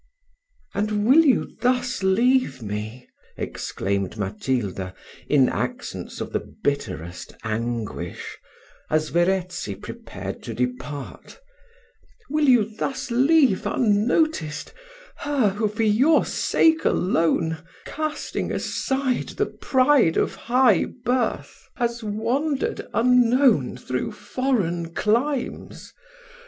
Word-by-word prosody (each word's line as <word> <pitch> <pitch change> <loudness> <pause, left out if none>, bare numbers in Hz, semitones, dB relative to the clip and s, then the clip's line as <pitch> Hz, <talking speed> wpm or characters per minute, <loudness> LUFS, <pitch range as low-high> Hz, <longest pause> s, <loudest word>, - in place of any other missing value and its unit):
"And 210 +1 0
will 285 +8 +7
you 270 - +2
thus 250 -1 +1
leave 195 - +2
me?" 110 +4 -5 0.3
exclaimed 100 +1 -3
Matilda, 100 -2 -2 0.3
in 135 -3 +5
accents - - -4
of - - -5
the - - +1
bitterest 90 - -4
anguish, 115 -5 -4 0.5
as 155 0 +1
Verezzi 175 - 0
prepared - - -8
to - - -6
depart 125 - -5 0.9
"will 300 -2 +3
you 240 -4 +6
thus 270 -1 -3
leave 265 - +4
unnoticed, 215 - +1 0.4
her 285 -7 +1
who, 210 +2 0
for 215 +2 -2
your 250 +9 +4
sake 320 -1 +2
alone, 165 -2 +1 0.3
casting 310 0 -3
aside 265 -2 -1
the - - +2
pride 260 - +3
of - - +1
high 250 +2 +3 0.2
birth, 250 0 -1
has 235 -1 -2
wandered, 245 +8 -1
unknown, 245 - +4
through 130 - -3
foreign 185 -10 -2
climes? 245 +6 -1
210 Hz, 95 wpm, -24 LUFS, -, 0.9 s, will